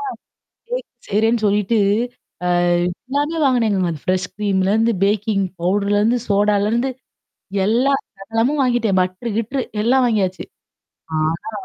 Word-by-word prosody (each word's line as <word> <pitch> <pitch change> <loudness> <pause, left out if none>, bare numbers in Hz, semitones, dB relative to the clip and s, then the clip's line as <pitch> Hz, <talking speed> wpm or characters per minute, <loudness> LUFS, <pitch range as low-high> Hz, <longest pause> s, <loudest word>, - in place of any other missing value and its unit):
ஆ. 420 -2 -3 0.6
Cake - - -3 0.2
செய்றேன்னு 220 +2 +2
சொல்லிட்டு, 210 +2 +2 0.7
அ - - +1 0.6
எல்லாமே 290 +4 -1
வாங்குனேங்க. 225 -7 +2
அந்த 150 - -7
ஃப்ரெஷ் 185 0 +1
ஸ்க்ரீம்லேருந்து 205 +3 +1
பேக்கிங் 205 -1 +1 0.2
பவுடர்லிருந்து 205 +5 +2
சோடாலேருந்து 210 +4 +2 0.8
எல்லாம் 260 +5 +2 0.2
சகலமும் 225 +8 0
வாங்கிட்டேன் 235 -6 +2
பட்டரு 185 +6 -2
கிட்டரு 255 +4 -1 0.2
எல்லாம் 255 +3 +3
வாங்கியாச்சு. 195 -5 0 0.8
ஆனா 165 - -2
215 Hz, 110 wpm, -20 LUFS, 200-245 Hz, 0.8 s, எல்லாம்